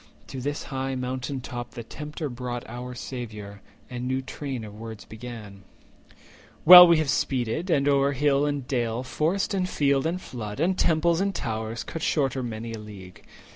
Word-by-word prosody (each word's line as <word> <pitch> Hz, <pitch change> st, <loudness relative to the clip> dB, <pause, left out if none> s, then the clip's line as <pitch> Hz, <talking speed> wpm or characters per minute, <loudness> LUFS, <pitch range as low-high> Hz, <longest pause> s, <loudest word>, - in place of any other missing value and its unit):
To 130 Hz, -, -6 dB
this 145 Hz, +3 st, -3 dB
high 135 Hz, -1 st, -3 dB
mountain 130 Hz, +1 st, -3 dB
top 120 Hz, 0 st, -7 dB
the 120 Hz, -, -6 dB
Tempter 150 Hz, +5 st, -6 dB
brought 120 Hz, -1 st, -5 dB
Our 125 Hz, +2 st, -7 dB
Saviour, 105 Hz, -6 st, -7 dB, 0.3 s
and 125 Hz, 0 st, -5 dB
new 130 Hz, +1 st, -1 dB
train 130 Hz, -2 st, -5 dB
of 105 Hz, -1 st, -9 dB
words 110 Hz, -1 st, -9 dB
began:— 110 Hz, -4 st, -9 dB, 1.0 s
"Well 180 Hz, +1 st, +12 dB
have 170 Hz, -1 st, +5 dB
we 155 Hz, -, +2 dB
speeded, 135 Hz, -, -1 dB
and 140 Hz, -4 st, +2 dB
o'er 140 Hz, 0 st, +3 dB
hill 145 Hz, +1 st, +2 dB
and 145 Hz, -3 st, -3 dB
dale, 120 Hz, -2 st, -1 dB
Forest, 155 Hz, -, -1 dB
and 185 Hz, -2 st, 0 dB
field, 140 Hz, -2 st, +2 dB
and 175 Hz, +2 st, -2 dB
flood, 110 Hz, -, -7 dB, 0.2 s
temples 170 Hz, +1 st, +2 dB
and 195 Hz, -1 st, -1 dB
towers, 110 Hz, -1 st, -3 dB
Cut 165 Hz, -, -6 dB
shorter 135 Hz, -4 st, 0 dB
many 115 Hz, -1 st, -5 dB
a 110 Hz, -, -6 dB
league. 100 Hz, -4 st, -11 dB
130 Hz, 170 wpm, -26 LUFS, 115-145 Hz, 1.0 s, Well